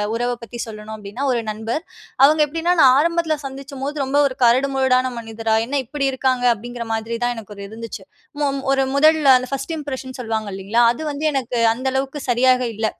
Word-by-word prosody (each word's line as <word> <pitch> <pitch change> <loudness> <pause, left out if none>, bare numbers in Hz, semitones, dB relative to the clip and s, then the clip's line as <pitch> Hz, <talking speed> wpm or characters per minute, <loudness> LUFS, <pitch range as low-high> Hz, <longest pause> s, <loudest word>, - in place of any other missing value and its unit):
உறவ 240 +1 -1
பத்தி 235 +1 -9
சொல்லணும். 215 0 -8
அப்படின்னா, 210 +6 -5
ஒரு 235 - 0
நண்பர். 225 +9 -4 0.4
அவங்க 305 +2 +4
எப்படின்னா, 330 +4 0
நான் 260 - +8
ஆரம்பத்தில 335 -1 +1
சந்திச்சம்போது, 275 +1 -6
ரொம்ப 270 +2 0
ஒரு 260 0 -8
கரடு 250 +4 +4
முரடான 255 -1 +2
மனிதரா, 225 -1 -2
என்ன 280 +1 0
இப்படி 275 +3 -2
இருக்காங்க? 255 -1 0
அப்படிங்கிற 240 +2 -7
மாதிரி 225 +1 -3
தான், 245 0 -1
எனக்கு 210 -1 -9
ஒரு 200 - -7
இருந்துச்சு. 225 +1 -8 0.4
மொ - - +3 0.3
ஒரு 270 0 +2
முதல்ல, 310 +1 +4
அந்த 255 0 -5
ஃபர்ஸ்ட் 275 +4 -3
இம்ப்ரஷன் 260 -3 -6
சொல்வாங்க, 220 -2 -3
இல்லைங்களா? 200 +5 +1
அது 285 - -9
வந்து 295 +2 -2
எனக்கு 250 -3 -2 0.2
அந்த 260 +3 -4
அளவுக்கு 270 +2 -2
சரியாக 255 +1 +4
இல்ல. 220 +1 -2
255 Hz, 185 wpm, -20 LUFS, 230-275 Hz, 0.4 s, நான்